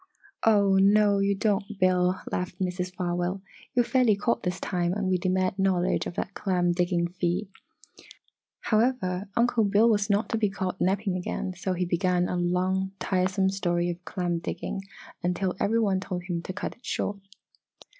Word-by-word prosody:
"Oh, 200 -3 +5
no, 200 +1 +5
you 200 0 +2
don't, 205 0 -1
Bill!" 185 0 +2
laughed 180 0 -3
Mrs. 180 -1 -2
Farwell. 180 +1 -2 0.4
"You're 245 -1 +4
fairly 250 -5 +3
caught 220 +4 0
this 180 0 -2
time 175 -2 -1
and 200 -1 -1
we 185 -1 +1
demand 185 +1 0
knowledge 190 -1 +1
of 175 - -7
that 195 - -3
clam 180 -4 +1
digging 175 0 +1
feat!" 180 +3 -2 1.1
However, 215 -5 0
Uncle 235 -1 +3
Bill 205 +3 +4
was 210 -2 +2
not 205 +2 +2
to 225 - 0
be 210 -2 +2
caught 190 -2 -4
napping 195 +1 +1
again, 185 +1 -3
so 185 +1 -2
he 180 0 -1
began 180 0 +1
a - - -2
long, 185 +2 0
tiresome 190 0 +1
story 175 -2 0
of 175 +1 -9
clam 175 -3 -2
digging 195 - -4 0.4
until 180 +1 -1
every 225 +3 +2
one 200 -4 +2
told 180 -2 -4
him 175 -2 -3
to 180 - -6
"cut 185 - -4
it 240 - -32
short!" 200 -3 -2
185 Hz, 170 wpm, -27 LUFS, 180-200 Hz, 1.1 s, Oh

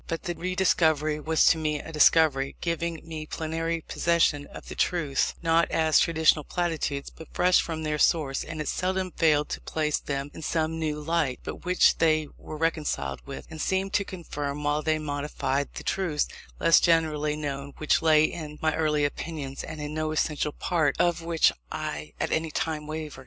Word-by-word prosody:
But 165 - -3
the 175 - -2
rediscovery 160 -4 +1
was 160 +1 +2
to 165 - +5
me 150 -1 -1
a 165 - -8
discovery, 150 -3 +4
giving 170 -1 -3
me 155 -1 -6
plenary 165 +1 -2
possession 165 -4 +1
of - - -11
the - - -6
truths, 150 -6 0
not 165 0 +3
as 160 -1 +3
traditional 160 -2 +3
platitudes, 160 -5 -2
but 160 - -12
fresh 180 0 +4
from 160 -2 -4
their 150 -1 -1
source; 145 -5 +2
and 155 - -7
it 155 - -3
seldom 185 0 -1
failed 150 -3 +2
to - - -4
place 150 -2 -1
them 140 0 -4
in - - -9
some 160 0 -1
new 155 -2 -2
light, 150 -4 -1
by - - -4
which 180 +1 +2
they 155 -2 +3
were 155 - -9
reconciled 150 - -1
with, 140 - -7
and 160 -1 -6
seemed 190 +1 0
to 200 - +2
confirm 150 -6 -5
while 145 +1 +1
they 155 0 +1
modified, 145 -2 -2
the - - -6
truths 175 -6 0 0.3
less 165 - +6
generally 155 -3 +2
known 140 -2 -4
which 155 - +2
lay 155 -2 +5
in 155 -1 -3
my 155 0 +1
early 150 -2 +1
opinions, 145 -2 -5
and 155 -1 -7
in 150 0 -5
no 155 0 -1
essential 150 -1 0
part 155 -3 0
of 175 -1 +2
which 165 -1 +3 0.2
I 75 +1 -5
at - - -1
any 160 0 0
time 155 0 -3
wavered. 155 -2 -6
155 Hz, 185 wpm, -27 LUFS, 150-165 Hz, 0.3 s, less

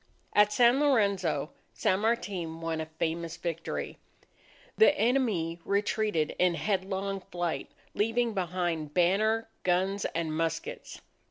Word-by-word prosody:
At 210 0 +5
San 240 +4 +5
Lorenzo, 200 - +2 0.2
San 185 - +1
Martin 190 -7 -1
won 165 -1 -2
a 155 - -5
famous 165 +1 -3
victory. 165 -1 -4 0.8
The 300 -9 +5
enemy 220 - +1
retreated 200 -5 0
in 180 -1 +3
headlong 195 0 -2
flight, 175 -2 -2 0.2
leaving 225 +2 +1
behind 175 -5 -2
banner, 215 +6 +2
guns, 190 +2 +1
and 165 -2 -1
muskets. 165 0 -3
185 Hz, 110 wpm, -29 LUFS, 165-215 Hz, 0.8 s, At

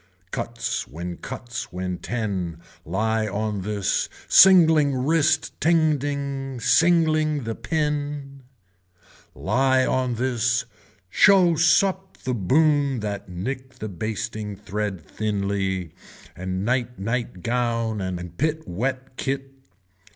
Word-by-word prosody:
Cuts 115 0 -3
when 85 +3 -6
cuts 120 -2 -6
when 90 0 -4
ten, 100 -8 -3 0.3
lie 110 +5 0
on 105 0 -2
this, 100 0 -1 0.2
singling 160 -7 +7
wrist 155 +3 +2
tending, 140 -4 0
singling 155 +2 +3
the 115 0 -3
pin. 145 +1 -3 0.9
Lie 130 0 +2
on 130 -1 0
this, 120 0 0 0.5
show 185 - +6
sup 190 +4 +2
the 130 - -1
boon 140 - +2
that 100 -2 -4
nick 130 +8 -5
the 110 -4 -6
basting 110 +2 -4
thread 100 -3 -4
thinly 100 -4 -2 0.4
and 95 +2 -3
night 125 0 0
night 115 -1 -3
gown 115 -3 0
and 90 -2 -5
pit 155 +2 -1
wet 130 +6 -3
kit. 135 +1 -3
120 Hz, 105 wpm, -24 LUFS, 105-145 Hz, 0.9 s, singling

